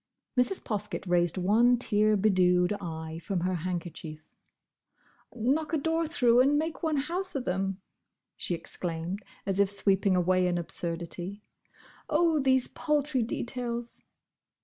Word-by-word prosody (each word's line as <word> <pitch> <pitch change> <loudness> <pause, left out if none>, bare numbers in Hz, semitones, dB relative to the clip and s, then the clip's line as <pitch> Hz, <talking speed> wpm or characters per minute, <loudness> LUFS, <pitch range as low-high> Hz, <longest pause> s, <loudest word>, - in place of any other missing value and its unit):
Mrs. 250 +10 +2
Poskett 210 -2 -3
raised 175 0 +2
one 225 +7 +4
tear 215 -3 +3
bedewed 180 -2 +3
eye 160 -2 -6
from 175 +1 -2
her 185 +1 0
handkerchief. 170 -3 -5 1.0
"Knock 275 +8 0
a - - +3
door 325 +2 0
through 245 -6 +3
and 280 +3 +4
make 320 +2 -2
one 315 -3 0
house 350 +6 -2
of 265 - -2
them!" 190 +1 -2 0.5
she 175 - -2
exclaimed, 170 +3 -4 0.2
as 195 0 -1
if 200 -1 +4
sweeping 195 -1 +2
away 180 0 +2
an 175 -1 0
absurdity. 175 +3 -4 0.7
"Oh, 320 0 +3
these 260 -2 +3
paltry 295 -3 0
details!" 240 0 -3
205 Hz, 130 wpm, -29 LUFS, 180-260 Hz, 1.0 s, one